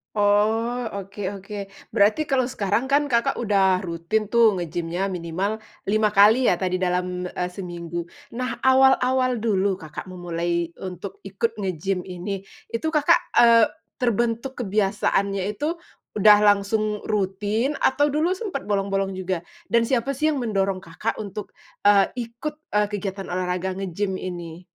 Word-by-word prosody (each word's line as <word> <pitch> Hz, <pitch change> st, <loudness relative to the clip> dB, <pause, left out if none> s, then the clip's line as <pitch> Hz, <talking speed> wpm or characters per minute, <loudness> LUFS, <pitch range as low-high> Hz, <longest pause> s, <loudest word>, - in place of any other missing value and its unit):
Oh, 220 Hz, +4 st, +2 dB
oke 200 Hz, 0 st, -5 dB
oke. 205 Hz, +2 st, -9 dB, 0.4 s
Berarti 215 Hz, +10 st, +3 dB
kalau 265 Hz, -2 st, +2 dB
sekarang 220 Hz, -2 st, 0 dB
kan 290 Hz, +1 st, +3 dB
Kakak 235 Hz, -4 st, +1 dB
udah 195 Hz, -4 st, +3 dB
rutin 185 Hz, +4 st, -2 dB
tuh 220 Hz, -4 st, +4 dB
nge-gym-nya 175 Hz, +2 st, -2 dB
minimal 190 Hz, +4 st, -3 dB, 0.2 s
5 215 Hz, 0 st, +2 dB
kali 215 Hz, +5 st, +6 dB
ya 175 Hz, -, 0 dB
tadi 185 Hz, -1 st, 0 dB
dalam, 180 Hz, 0 st, -1 dB
eh, 180 Hz, -, -2 dB
seminggu. 175 Hz, -2 st, -5 dB, 0.3 s
Nah 245 Hz, -1 st, -3 dB
awal-awal 260 Hz, -1 st, +4 dB
dulu, 200 Hz, -3 st, +1 dB
Kakak 160 Hz, +4 st, -8 dB
memulai 170 Hz, -1 st, -2 dB, 0.2 s
untuk 185 Hz, -, -7 dB
ikut 460 Hz, -, -2 dB
nge-gym 190 Hz, -1 st, -2 dB
ini, 190 Hz, +2 st, -5 dB, 0.2 s
itu 230 Hz, +7 st, -3 dB
Kakak, 300 Hz, -2 st, +4 dB, 0.2 s
eee, 230 Hz, -2 st, +7 dB, 0.3 s
terbentuk 240 Hz, +2 st, -1 dB
kebiasaannya 200 Hz, -2 st, 0 dB
itu 320 Hz, +6 st, -2 dB, 0.4 s
udah 210 Hz, +1 st, +8 dB
langsung 210 Hz, +1 st, +2 dB
rutin 210 Hz, +6 st, -1 dB
atau 290 Hz, +2 st, +2 dB
dulu 325 Hz, +5 st, +1 dB
sempat 370 Hz, -, -5 dB
bolong-bolong 195 Hz, -1 st, 0 dB
juga 185 Hz, -1 st, -2 dB, 0.3 s
dan 230 Hz, -1 st, +3 dB
siapa 260 Hz, +1 st, +1 dB
sih 305 Hz, +4 st, 0 dB
yang 280 Hz, -5 st, 0 dB
mendorong 195 Hz, -3 st, -1 dB
Kakak 175 Hz, +7 st, -3 dB
untuk, 205 Hz, +1 st, -8 dB, 0.3 s
eee, 200 Hz, -1 st, +5 dB, 0.2 s
ikut, 295 Hz, +6 st, -6 dB, 0.2 s
eee, 210 Hz, 0 st, +3 dB
kegiatan 195 Hz, -2 st, -4 dB
olahraga 185 Hz, +1 st, -2 dB
nge-gym 190 Hz, 0 st, -2 dB
ini? 175 Hz, -1 st, -7 dB
205 Hz, 140 wpm, -24 LUFS, 185-235 Hz, 0.4 s, udah